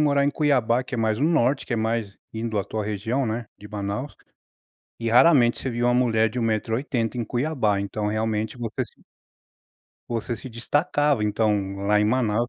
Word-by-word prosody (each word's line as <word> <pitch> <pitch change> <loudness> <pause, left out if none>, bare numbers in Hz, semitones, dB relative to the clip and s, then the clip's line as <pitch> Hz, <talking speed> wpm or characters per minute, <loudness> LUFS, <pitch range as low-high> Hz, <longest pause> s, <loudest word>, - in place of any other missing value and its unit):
morar 140 -2 +3
em 145 - +2
Cuiabá, 130 -5 +2
que 125 - -7
é 120 - -2
mais 110 -1 +1
no 145 - +2
norte, 140 -4 +2
que - - -4
é - - +1
mais 110 -2 -1 0.2
indo 110 -1 -2
à 100 - -1
tua 110 +2 -3
região, 110 +6 -1
né, 115 +1 -3
de 105 - -11
Manaus, 105 +6 -4 0.8
e 115 - -2
raramente 125 0 +5
você 130 - -3
via 120 0 -1
uma 120 - +3
mulher 115 -3 +3
de 125 +4 -5
1 - - 0
metro 110 0 0
e - - +2
80 125 -5 -2
em 120 - -1
Cuiabá, 120 -6 0
então 105 +1 -2
realmente 110 +1 -1
você 115 -2 -3
se - - -20 1.1
você 120 0 -2
se 130 - -9
destacava, 145 +1 +1
então, 105 -2 0
lá 105 0 +4
em - - +3
Manaus. 115 0 +1
115 Hz, 200 wpm, -24 LUFS, 110-125 Hz, 1.1 s, raramente